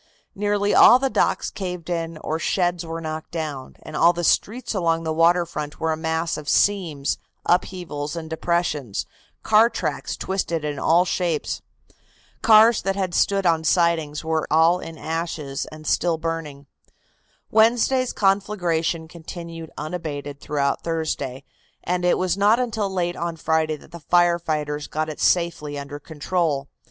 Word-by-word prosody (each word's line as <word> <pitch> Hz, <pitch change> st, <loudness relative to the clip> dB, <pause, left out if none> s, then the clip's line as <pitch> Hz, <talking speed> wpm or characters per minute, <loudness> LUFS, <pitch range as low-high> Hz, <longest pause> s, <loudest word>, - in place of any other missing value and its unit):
Nearly 205 Hz, 0 st, 0 dB
all 245 Hz, -, +8 dB
the 265 Hz, 0 st, -1 dB
docks -, -, +1 dB
caved 180 Hz, -3 st, -5 dB
in 165 Hz, -2 st, -3 dB
or 160 Hz, +1 st, -2 dB
sheds 175 Hz, -1 st, 0 dB
were 165 Hz, 0 st, -5 dB
knocked 155 Hz, 0 st, -5 dB
down, 150 Hz, -5 st, -5 dB
and 155 Hz, -, -9 dB
all 170 Hz, +3 st, +5 dB
the 175 Hz, 0 st, -4 dB
streets 230 Hz, +9 st, +1 dB
along 165 Hz, -4 st, +1 dB
the 160 Hz, -1 st, -1 dB
water 170 Hz, +2 st, +4 dB
front 150 Hz, -3 st, -6 dB
were 160 Hz, 0 st, 0 dB
a -, -, +1 dB
mass 160 Hz, +1 st, -1 dB
of 150 Hz, -1 st, -6 dB
seams, 170 Hz, -9 st, +1 dB, 0.3 s
upheavals 170 Hz, -4 st, -1 dB
and 165 Hz, -1 st, -5 dB
depressions, 160 Hz, -, -1 dB, 0.4 s
car 220 Hz, +2 st, +5 dB
tracks -, -, -3 dB
twisted 170 Hz, -5 st, -2 dB
in 145 Hz, -2 st, -3 dB
all 170 Hz, +5 st, +4 dB
shapes. 175 Hz, -4 st, -1 dB, 0.8 s
Cars 220 Hz, +1 st, +6 dB
that 195 Hz, 0 st, -1 dB
had 190 Hz, -3 st, -2 dB
stood 195 Hz, +1 st, +2 dB
on 165 Hz, -2 st, +3 dB
sidings 160 Hz, -3 st, +1 dB
were 160 Hz, -1 st, 0 dB
all 165 Hz, +3 st, +4 dB
in 165 Hz, -2 st, -8 dB
ashes 160 Hz, -4 st, -4 dB
and 155 Hz, 0 st, -11 dB
still 170 Hz, 0 st, +1 dB
burning." 160 Hz, -3 st, -5 dB, 0.9 s
Wednesday's 240 Hz, +3 st, +3 dB
conflagration 180 Hz, -5 st, 0 dB
continued 165 Hz, 0 st, -8 dB
unabated 150 Hz, -3 st, -5 dB
throughout 140 Hz, -2 st, -1 dB
Thursday, 155 Hz, -5 st, -3 dB, 0.4 s
and 180 Hz, 0 st, -1 dB
it 180 Hz, -, +3 dB
was 185 Hz, -1 st, 0 dB
not 205 Hz, +4 st, +4 dB
until 220 Hz, -5 st, -1 dB
late 175 Hz, -2 st, -1 dB
on 170 Hz, -1 st, -3 dB
Friday 160 Hz, -1 st, 0 dB
that 150 Hz, -, -16 dB
the 170 Hz, -, -9 dB
fire 175 Hz, +1 st, +3 dB
fighters 150 Hz, -3 st, -3 dB
got 155 Hz, +1 st, -2 dB
it 155 Hz, -, -7 dB
safely 170 Hz, -4 st, +1 dB
under 140 Hz, +1 st, -7 dB
control. 155 Hz, -2 st, -2 dB
165 Hz, 155 wpm, -23 LUFS, 155-180 Hz, 0.9 s, all